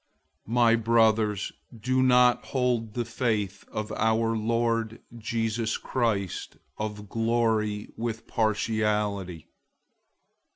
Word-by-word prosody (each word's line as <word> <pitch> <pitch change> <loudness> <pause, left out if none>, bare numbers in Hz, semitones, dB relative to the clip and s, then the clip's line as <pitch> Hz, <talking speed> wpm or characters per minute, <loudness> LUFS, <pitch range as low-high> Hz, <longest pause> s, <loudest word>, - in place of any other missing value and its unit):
002:001 110 - -5
My 120 -1 +5
brothers, 110 -3 +2 0.3
don't 125 +1 +4
hold 120 -4 -1
the 120 -1 -1
faith 110 -4 -2
of 105 0 -4
our 115 +1 +1
Lord 115 0 0 0.2
Jesus 115 0 -1
Christ 110 -7 -2 0.2
of 105 -1 -4
glory 110 -2 0
with 115 -1 -4
partiality. 105 -5 -1
110 Hz, 90 wpm, -27 LUFS, 105-115 Hz, 0.3 s, My